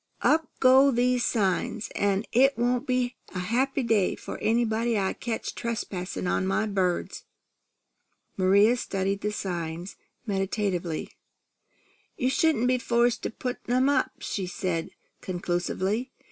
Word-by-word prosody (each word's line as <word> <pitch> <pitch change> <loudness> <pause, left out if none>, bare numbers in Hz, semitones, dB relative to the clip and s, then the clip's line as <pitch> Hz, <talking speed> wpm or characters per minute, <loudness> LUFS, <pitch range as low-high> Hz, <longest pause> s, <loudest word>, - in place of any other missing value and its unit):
Up 320 0 +3
go 265 +2 +6
these 250 -1 +2
signs, 205 0 0
an' 200 +1 0
it 270 +3 +4
won't 245 +3 0
be 250 -1 0 0.2
a - - -2
happy 255 +9 0
day 220 -5 +2
for - - -8
anybody 230 0 +1
I 190 -1 0
catch 230 -2 -4
trespassin' 195 -7 -4
on 185 +1 0
my 215 +3 +1
birds." 190 -4 -1 1.1
Maria 200 +5 +4
studied 195 -2 -2
the 210 - -1
signs 175 -2 -4 0.3
meditatively. 195 -5 -2 1.1
"You 255 +1 +1
shouldn't 310 -6 +2
be 255 0 +2
forced 240 0 +2
to - - -2
put 250 +2 -5
'em 255 +3 +3
up," 275 -2 +2
she 190 -3 -3
said 180 -2 -2 0.3
conclusively. 185 +6 -2
220 Hz, 130 wpm, -27 LUFS, 190-245 Hz, 1.1 s, go